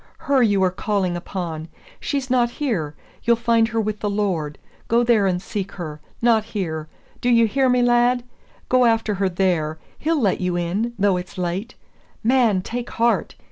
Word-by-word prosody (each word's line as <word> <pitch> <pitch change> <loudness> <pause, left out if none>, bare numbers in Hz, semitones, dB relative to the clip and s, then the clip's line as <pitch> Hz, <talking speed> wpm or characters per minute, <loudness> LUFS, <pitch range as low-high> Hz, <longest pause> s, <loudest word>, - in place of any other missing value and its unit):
her 280 -4 +2
you 205 -5 +3
are 185 - +3
calling 190 -2 -1
upon. 170 -3 -5 0.3
She's 275 -2 -2
not 245 -2 +2
here. 215 - -2 0.3
You'll 235 0 +4
find 230 -1 +2
her 225 0 -2
with 215 -1 -2
the 210 - -1
Lord. 185 -8 -1 0.3
Go 235 +1 +3
there 230 -4 +3
and 180 -1 0
seek 195 +1 -5
her, 155 -5 -7 0.2
not 230 -2 +4
here. 160 -8 -4 0.3
Do 245 - +1
you 230 -1 +5
hear 260 +4 +2
me, 250 0 +3
lad? 245 0 +3 0.4
go 255 -1 +4
after 225 -2 +2
her 195 - +3
there. 175 -4 0 0.2
He'll 320 0 +1
let 200 -8 +1
you 180 -1 0
in, 195 +8 -1
though 200 -2 +3
it's 180 +1 -7
late. 185 +6 -3 0.5
Man, 230 -6 +3
take 240 +3 -4
heart! 235 +1 0
210 Hz, 180 wpm, -22 LUFS, 180-240 Hz, 0.5 s, you